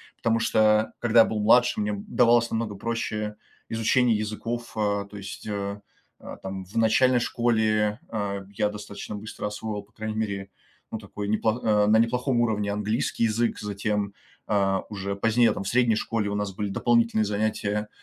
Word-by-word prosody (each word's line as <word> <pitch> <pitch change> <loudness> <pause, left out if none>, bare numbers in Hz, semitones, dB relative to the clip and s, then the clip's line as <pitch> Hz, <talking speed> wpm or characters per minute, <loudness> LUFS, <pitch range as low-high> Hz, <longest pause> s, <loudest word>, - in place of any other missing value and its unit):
Потому 115 0 +1
что 110 -1 +3
когда 120 -1 +4
я 115 - +9
был 110 - -2
младше, 120 +3 +4
мне, 105 0 0
м, 100 -1 -5
давалось 120 -1 +4
намного 110 -2 -2
проще 105 0 -3 0.3
изучение 115 +1 +2
языков. 115 +3 -4
Э, 100 -2 0
то 105 - -12
есть, 100 -1 -8
э, 100 -1 -3 0.4
э, - - -9
там, 95 0 -5
в 95 - -17
начальной 120 +3 +4
школе, 110 -3 +1
э, 100 -3 -3
я 105 +1 +1
достаточно 105 0 -7
быстро 110 +1 -6
освоил, 105 0 -4
по 100 - -28
крайней 110 0 -5
мере, 100 -3 -3 0.4
ну, - - -4
такой 105 -1 -6
неплох 110 +3 0
а, 105 -1 +3
на 110 - +5
неплохом 125 +2 +1
уровне 105 -3 +1
английский 105 +3 0
язык. 115 +1 0
Затем, 105 -1 -2 0.4
а, 95 -2 +2
уже 100 -1 -4
позднее, 115 +3 +3
там, - - -4
в - - -6
средней 120 -1 +3
школе 110 -2 -1
у 100 - -2
нас 105 -1 -2
были 105 +1 -3
дополнительные 115 +1 +2
занятия, 105 0 -1
110 Hz, 175 wpm, -26 LUFS, 105-115 Hz, 0.4 s, я